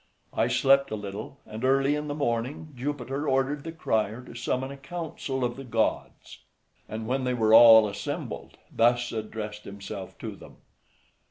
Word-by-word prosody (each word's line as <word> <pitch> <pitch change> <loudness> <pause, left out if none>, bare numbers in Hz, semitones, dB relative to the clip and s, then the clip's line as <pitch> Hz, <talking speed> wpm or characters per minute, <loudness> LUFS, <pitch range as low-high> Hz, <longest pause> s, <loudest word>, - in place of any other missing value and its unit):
I - - +2
slept 140 0 +4
a - - -2
little, 105 +5 -7
and 110 +3 -8
early 135 +2 +3
in 150 0 -2
the 145 - -3
morning 140 +3 -2
Jupiter 140 +2 -3
ordered 135 +2 +1
the 165 - -5
crier 110 -7 -1
to - - -12
summon 130 +2 -2
a 140 - -8
council 145 -3 -4
of 120 -1 -1
the 135 - -7
gods, 115 -3 -2 0.5
and 110 +1 -5
when 130 +3 -1
they 125 0 0
were 110 -2 +3
all 115 -1 +9
assembled, 145 - -5 0.2
thus 120 +1 +3
addressed 105 -1 -5
himself 100 -1 -8
to - - -6
them. - - -14
125 Hz, 165 wpm, -27 LUFS, 110-140 Hz, 0.5 s, all